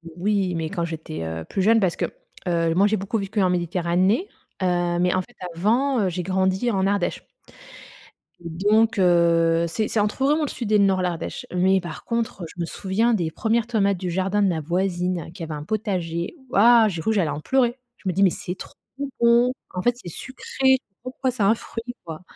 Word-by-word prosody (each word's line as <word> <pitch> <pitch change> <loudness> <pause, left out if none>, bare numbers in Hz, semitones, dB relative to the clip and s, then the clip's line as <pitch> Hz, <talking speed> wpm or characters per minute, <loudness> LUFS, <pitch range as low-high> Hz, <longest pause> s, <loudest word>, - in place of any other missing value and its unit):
Oui, 190 0 0
mais 160 -1 -2
quand 170 +1 -2
j'étais, 160 - -6
heu, 80 0 -4
plus 195 - -2
jeune 225 +4 +5
parce 185 -3 +1
que, - - 0 0.4
heu, 165 -1 +1
moi, 195 +4 +4
j'ai 215 - +1
beaucoup 200 +3 -2
vécu 200 +1 -2
en 185 - +3
Méditerranée. 180 - +1 0.3
Heu, 175 -1 +1
mais 180 0 +2
en 185 - +1
fait, - - -16 0.2
avant, 240 +8 +2
heu, - - +1
j'ai 180 0 -3
grandi 190 +5 +1
en 195 -1 +1
Ardèche. 200 -3 -1 1.1
Donc 205 +6 +1
heu, 170 -2 +4
c'est 215 +6 -2
c'est 220 - 0
entre 210 +5 0
vraiment 300 +3 +3
le - - 0
sud 225 -4 -4
et 210 - +6
le 200 - +5
nord, 190 -1 +2
l'Ardèche, 175 -2 -3
mais 190 +1 +3
par 175 -2 -8
contre, 230 -4 -2
heu, - - -3
je 170 - -14
me - - 0
souviens 200 +7 0
des 170 -7 0
1res 225 +5 0
tomates 200 -5 +1
du 180 0 -4
jardin 190 +3 0
de 200 - +4
ma 165 -4 0
voisine 175 0 -1
qui 175 - -8
avait 160 -1 -5
un 150 0 -7
potager. 180 - -2
Waouh, 230 0 +6
j'ai 170 -5 -3
cru 220 - 0
j'allais 185 -7 +1
en 150 - -5
pleurer. 250 +3 +1 0.2
Je - - -9
me 185 - +1
dis 195 - +2
«Mais 190 - +6
c'est 180 +1 -5
trop - - -10 0.5
bon!» 235 +1 +5 0.2
en 180 - -2
fait, 245 +5 +2
c'est 175 - -8
sucré. 265 +6 0 0.3
Pourquoi 255 +1 -2
c'est 235 -4 -2
un 200 +3 +5
fruit, 230 +1 -7
quoi? 160 -1 -7
190 Hz, 210 wpm, -23 LUFS, 175-220 Hz, 1.1 s, et